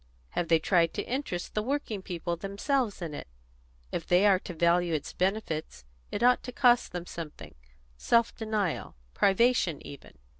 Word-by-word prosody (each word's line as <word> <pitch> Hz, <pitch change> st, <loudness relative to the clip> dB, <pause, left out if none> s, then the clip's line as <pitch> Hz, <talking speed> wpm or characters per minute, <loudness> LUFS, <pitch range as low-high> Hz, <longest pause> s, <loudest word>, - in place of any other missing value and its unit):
"Have 175 Hz, -, -2 dB
they 165 Hz, 0 st, +5 dB
tried 165 Hz, 0 st, +2 dB
to -, -, -1 dB
interest 245 Hz, -9 st, -4 dB
the 210 Hz, -, 0 dB
working 235 Hz, -4 st, -2 dB
people 175 Hz, -2 st, -3 dB
themselves 205 Hz, -, -1 dB
in 160 Hz, -3 st, -5 dB
it? 145 Hz, -, -7 dB, 0.6 s
If 165 Hz, -, -4 dB
they 180 Hz, +3 st, +4 dB
are 195 Hz, -3 st, +5 dB
to 180 Hz, -, -8 dB
value 170 Hz, 0 st, +2 dB
its 150 Hz, -, -4 dB
benefits, 180 Hz, -, -2 dB, 0.3 s
it -, -, -2 dB
ought 250 Hz, 0 st, +5 dB
to 250 Hz, -, -7 dB
cost 245 Hz, -1 st, +3 dB
them 175 Hz, -1 st, -5 dB
something 150 Hz, -, -8 dB, 0.4 s
self 235 Hz, -, +2 dB
denial, 215 Hz, -, -2 dB, 0.2 s
privation 195 Hz, -, +3 dB
even." 140 Hz, -, -11 dB
185 Hz, 160 wpm, -29 LUFS, 170-225 Hz, 0.6 s, they